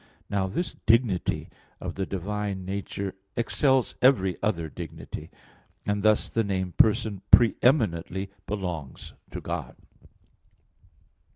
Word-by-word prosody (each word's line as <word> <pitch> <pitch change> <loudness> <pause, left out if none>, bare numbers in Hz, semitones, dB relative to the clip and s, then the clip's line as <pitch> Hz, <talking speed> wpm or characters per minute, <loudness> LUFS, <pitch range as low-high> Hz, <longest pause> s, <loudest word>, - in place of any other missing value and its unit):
Now 100 -2 +1
the 170 - -2
dignity 115 -5 +2 0.3
of - - -4
the 95 0 -3
divine 100 0 -3
nature 100 0 -3 0.2
excels 130 +2 +2
every 95 -9 +4
other 90 -6 0
dignity; 80 0 -8 0.6
and 105 0 0
thus 110 0 +3
the 115 - 0
name 95 -3 -1
"person" 105 -1 +3
pre 120 -2 +8
eminently 95 - +2 0.2
belongs 90 -9 -5 0.2
to - - -5
God. - - -4
100 Hz, 110 wpm, -27 LUFS, 95-110 Hz, 0.6 s, pre